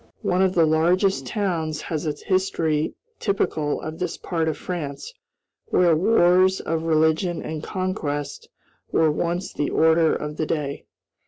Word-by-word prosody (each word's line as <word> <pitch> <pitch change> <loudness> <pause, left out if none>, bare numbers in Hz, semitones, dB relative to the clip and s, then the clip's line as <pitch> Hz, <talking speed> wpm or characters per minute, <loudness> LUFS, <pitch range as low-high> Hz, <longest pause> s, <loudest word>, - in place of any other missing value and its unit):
One 180 +1 +1
of 190 -1 +2
the 165 -2 +5
largest 175 +5 +2
towns 165 -8 -2
has 160 -1 -3
a 150 - 0
history 160 -3 0 0.2
typical 155 -7 -1
of 155 +1 -6
this 180 -2 -3
part 165 -3 -2
of 160 - -1
France, 165 - -5 0.5
where 175 -3 +4
wars 185 0 +4
of 160 0 -2
religion 160 +2 +1
and 155 -1 -5
conquest 155 -7 -4 0.4
were 160 -1 +3
once 175 +4 -2
the 145 - -1
order 160 0 +3
of 150 0 -5
the 155 - -1
day. 145 -3 -3
165 Hz, 145 wpm, -23 LUFS, 155-180 Hz, 0.5 s, the